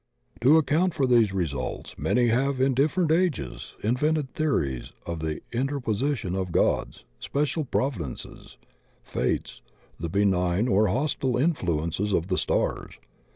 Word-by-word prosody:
To 140 +6 +6
account 160 +4 +2
for 135 - +2
these 120 -5 +4
results, 75 -9 -3
many 120 -1 +2
have 130 +3 +1
in 130 +1 +3
different 155 +5 +2
ages 160 - -1
invented 135 +5 0
theories 70 - -1
of 85 -1 -4
the 80 -1 -3
interposition 130 -4 -1
of 95 -2 -2
gods, - - 0 0.2
special 150 - -1
providences, 115 - -4 0.5
fates, - - -2 0.4
the 85 +1 -3
benign 95 +2 +2
or 105 -1 +3
hostile 130 +4 0
influ 115 - +1
ences 95 +4 0
of 85 +3 -4
the 90 - +1
stars. - - -1
120 Hz, 130 wpm, -26 LUFS, 90-140 Hz, 0.5 s, To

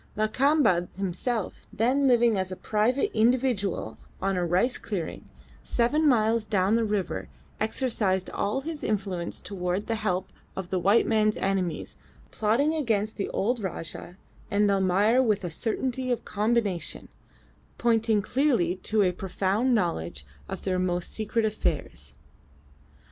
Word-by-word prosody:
Lakamba 215 - +3
himself, 200 +3 -3
then 260 +6 +2
living 240 -3 +4
as 190 -1 -2
a - - -3
private 225 +8 0
individual 225 - +1 0.2
on 195 0 0
a 180 - 0
rice 180 +9 +1
clearing, 190 -7 -5 0.3
seven 295 +6 +2
miles 225 -2 +3
down 200 -1 +1
the 230 0 +3
river, 205 -3 -2 0.3
exercised 215 -5 0
all 235 +7 -1
his 315 +1 -6
influence 195 -5 -2
towards 185 0 -3
the 230 - -1
help 190 -2 -1 0.3
of 190 -1 -6
the 185 - +1
white 200 +6 +4
man's 215 -1 +2
enemies, 190 -4 -2 0.4
plotting 235 +9 +2
against 220 -8 0
the 200 - -2
old 240 +5 0
Rajah 175 -2 -6 0.3
and 205 0 +3
Almayer 200 +5 +3
with 215 -5 +1
a 175 - -3
certainty 255 +6 -2
of 245 - -2
combination, 210 -5 -1 0.7
pointing 225 -3 +2
clearly 235 - +1
to 215 +2 +1
a 180 - +3
profound 195 +7 0
knowledge 85 - -2 0.2
of - - -6
their 185 -1 0
most 180 -1 -1
secret 220 +1 0
affairs. 145 - -3
210 Hz, 135 wpm, -27 LUFS, 185-235 Hz, 0.7 s, living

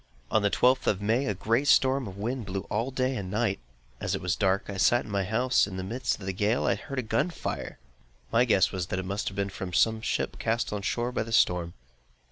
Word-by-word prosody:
On 110 - +3
the 100 - +2
twelfth 130 +5 +3
of 95 - +2
May, 115 +6 +1
a 105 - 0
great 115 +9 0
storm 130 -3 +4
of 95 0 -9
wind 115 +1 -3
blew 95 +1 -3
all 115 +5 0
day 130 0 -1
and 100 -5 -4
night. 105 0 0 0.4
As - - -1
it - - -3
was 90 -2 0
dark, 95 -1 +1
I 100 - -5
sat 120 +5 +3
in - - -9
my 100 -1 0
house; 125 +5 +2
and 95 - -8
in - - -5
the 95 - -3
midst 130 -2 -1
of 95 - -9
the 95 - -2
gale, 105 +6 +1
I - - +3
heard 135 - -7
a 130 - 0
gun 115 +9 0
fire! 170 - -5 0.5
My 115 +2 +4
guess 110 -6 +3
was 90 -3 -3
that 95 - -3
it 95 - -3
must 100 +3 -3
have 100 - -12
been 100 0 -1
from 95 -2 -6
some 110 +4 +3
ship - - -2
cast 115 -1 -1
on 105 - -3
shore 120 +4 -1
by 125 - -1
the 115 +1 -5
storm. 90 -6 +2
105 Hz, 260 wpm, -28 LUFS, 95-120 Hz, 0.5 s, storm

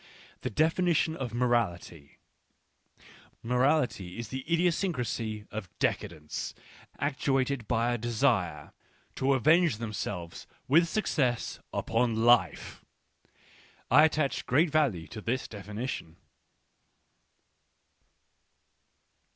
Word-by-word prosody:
The - - -2
definition 160 - +2
of 130 -6 -4
morality 110 - -1 0.6
;': - - -25
Morality 125 - +1
is 115 -2 -6
the 130 +1 -5
idiosyncrasy 145 - 0
of 105 -4 -6
decadents, 75 -3 -3 0.4
actuated 135 -3 0
by 120 0 +1
a 120 - -2
desire 110 - 0 0.4
to 135 +1 +2
avenge 155 0 +4
themselves 105 -6 -5 0.2
with 165 +5 +5
success 140 - -1
upon 115 -1 0
life. 120 -9 +2 1.1
I 150 - +8
attach 145 -5 -1
great 150 +5 +3
value 135 - +1
to 110 - -9
this 125 +4 -2
definition. 105 -3 -6
120 Hz, 90 wpm, -29 LUFS, 105-140 Hz, 1.1 s, I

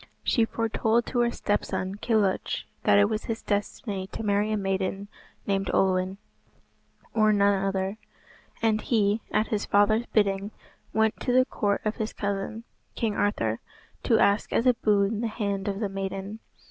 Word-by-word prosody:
She 230 -3 +3
foretold 225 +1 0
to 245 - -2
her 240 0 +3
stepson, 195 -4 -2
Kilhuch, 210 -3 0 0.2
that - - +5
it 205 0 +5
was 215 0 -3
his 225 -1 -4
destiny 205 -1 -2
to 225 - -6
marry 205 +1 +1
a 215 - +1
maiden 195 0 -2 0.4
named 195 -1 0
Olwen, 185 0 +1 1.0
or 215 -1 +4
none 200 -1 +3
other, 195 +2 -1 0.6
and 215 -1 +2
he, 215 -2 +1
at 215 - +1
his 215 -1 -1
father's 215 +3 +3
bidding, 200 -1 +1 0.4
went 220 0 +1
to - - -1
the 255 +1 +5
court 205 -5 -1
of 215 - -1
his 220 0 -3
cousin, 200 +2 -3 0.3
King 225 -2 0
Arthur, 115 - 0 0.4
to - - +3
ask 200 +1 +2
as 230 - +1
a 250 - +6
boon 210 -1 +1
the 235 - 0
hand 200 -2 -3
of 200 -1 -2
the 215 - 0
maiden. 195 +2 -5
205 Hz, 160 wpm, -27 LUFS, 195-220 Hz, 1.0 s, a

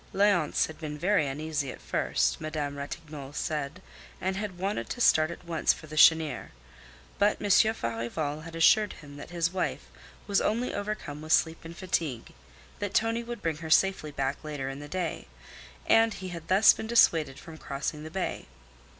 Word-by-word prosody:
Léonce 195 -6 +3
had 160 - -10
been 150 -2 -5
very 175 -2 +2
uneasy 145 0 -3
at - - -11
first, - - 0
Madame 150 -2 -3
Ratignolle 145 -1 -7
said, 155 +3 -3 0.4
and 190 +1 -1
had 195 -2 -4
wanted 190 - -2
to - - -5
start 155 -9 +4
at 170 - -9
once 165 -2 +2
for - - -11
the 155 0 -9
Chênière. 160 -3 +5 0.7
But 205 +1 +3
Monsieur 205 +2 +4
Farival 145 - -3
had 165 +1 -9
assured 205 +5 +4
him 145 -1 -12
that 145 - -9
his 170 0 0
wife 180 - -2 0.4
was 200 -1 +2
only 235 +4 0
overcome 200 -8 -4
with 155 +1 0
sleep 165 0 +2
and 165 +1 -10
fatigue, 160 -10 -2 0.5
that 205 -1 -4
Tonie 225 +1 +2
would 240 0 -7
bring 160 -2 -1
her 160 0 -7
safely 190 -2 +3
back 140 0 -3
later 145 -3 -4
in 135 +1 -6
the 145 - -8
day; 180 0 -3 0.6
and 225 0 +4
he 185 - -6
had 170 -2 -8
thus 195 +4 +7
been 220 - -6
dissuaded 165 - +4
from 160 +3 -11
crossing 145 +2 -4
the 155 - -7
bay. 190 +3 -3
160 Hz, 180 wpm, -28 LUFS, 150-190 Hz, 0.7 s, thus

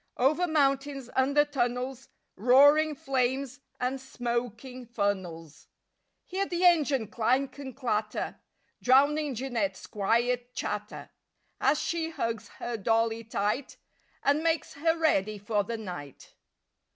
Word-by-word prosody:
Over 305 +8 +3
mountains, 275 -4 0
under 280 +3 +4
tunnels, 255 -1 -2 0.3
Roaring 285 +7 +5
flames 265 0 -1 0.2
and 255 +1 -2
smoking 245 0 -4
funnels— 190 -8 -3 0.6
Hear 390 +2 -2
the 355 +1 0
engine 295 -9 +4
clank 255 +6 0
and 265 -3 -7
clatter! 215 -5 -2 0.4
Drowning 285 +2 +3
Jeanette's 230 -6 -2
quiet 240 +4 0
chatter - - -5 0.5
As 295 +2 +3
she 330 -1 -1
hugs 230 -8 -3
her 235 -1 -5
dolly 225 +2 +1
tight 225 +4 -2 0.5
And 285 +2 +3
makes 325 -1 0
her 325 +3 +1
ready 215 -10 +1
for 205 +1 0
the 230 +3 -4
night. 175 - -9
250 Hz, 115 wpm, -28 LUFS, 225-285 Hz, 0.6 s, Roaring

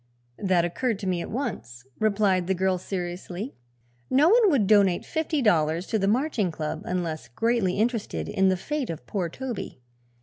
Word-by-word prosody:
"That 185 -3 +2
occurred 225 +6 -1
to 200 -1 -5
me 180 -2 0
at - - -6
once," 120 - -5
replied 200 -4 +2
the 190 - +1
girl 185 0 +1
seriously. 180 +5 -5 0.6
"No 295 +5 +5
one 450 0 +6
would 270 - +3
donate 195 -3 +4
fifty 315 -3 -1
dollars 165 -4 +2
to 220 - -1
the 195 - +1
Marching 230 - +1
Club 155 -2 -4
unless 170 -3 -3
greatly 225 - +1
interested 210 - -1
in 190 - +2
the 185 - +1
fate 290 +6 -3
of 155 -7 -6
poor 180 - -2
Toby. 245 - -6
190 Hz, 170 wpm, -26 LUFS, 175-235 Hz, 0.6 s, one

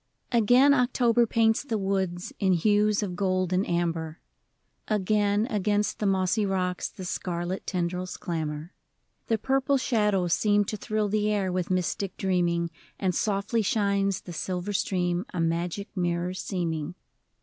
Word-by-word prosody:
I. 240 - +4
GAIN 250 +6 +6
October 245 -2 +3
paints 225 0 +3
the 230 -6 -2
woods 190 -3 -2
In 190 -2 +3
hues 210 +4 +3
of 185 -3 -4
gold 185 -1 0
and 185 +2 +2
amber; 165 -2 -1 0.7
Again, 210 0 +2
against 210 -3 0
the 210 - +1
mossy 190 +2 +2
rocks, 185 -2 -1
The 190 -3 -9
scarlet 175 +1 -3
tendrils 180 0 -2
clamber; 160 -1 -4 0.5
The 225 - +2
purple 270 +4 +1
shadows 210 -8 +1
seem 205 -1 +3
to 215 - -3
thrill 215 +1 -1
The 210 +1 +1
air 195 -3 0
with 180 -1 -2
mystic 185 +1 -1
dreaming, 175 -3 0 0.3
And 185 -2 0
softly 205 +4 0
shines 200 -2 +1
the 175 - -9
silver 180 +4 -3
stream, 180 -2 0
A - - -2
magic 170 +5 -2
mirror 175 0 -1
seeming. 170 -4 -3
190 Hz, 145 wpm, -27 LUFS, 175-210 Hz, 0.7 s, GAIN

